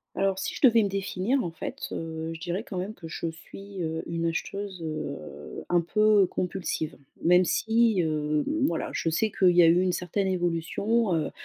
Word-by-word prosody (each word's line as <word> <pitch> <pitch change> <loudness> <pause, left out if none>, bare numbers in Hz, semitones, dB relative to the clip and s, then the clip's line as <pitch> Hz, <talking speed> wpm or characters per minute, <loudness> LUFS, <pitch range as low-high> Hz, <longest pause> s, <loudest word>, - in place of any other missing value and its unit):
Alors, 195 -1 +1
si 190 - -3
je - - -7
devais 230 -2 +6
me 205 - +1
définir, 195 +6 -1
en 170 - -3
fait, 165 - -6
heu, 160 0 -4
je 165 - -10
dirais 180 +5 -3
quand 190 - -5
même 195 +4 -4
que 165 - -10
je 165 - -4
suis, 195 +4 -9
heu, 160 0 -2
une 165 0 -2
acheteuse, 190 +2 -4
heu, 155 -3 -4 0.5
un 175 0 +3
peu 210 +3 +4
compulsive. 180 -4 -3 0.3
Même 180 +2 +5
si, 225 +1 +2
hem, 150 -2 0 0.2
voilà, 165 - -2
je 165 - -1
sais 215 +7 +1
qu'il 185 -2 +4
y 175 0 +6
a - - +7
eu 170 +2 +5
une 185 -1 +1
certaine 185 +3 -1
évolution, 185 +4 0
heu 155 -2 0
180 Hz, 195 wpm, -27 LUFS, 165-200 Hz, 0.5 s, a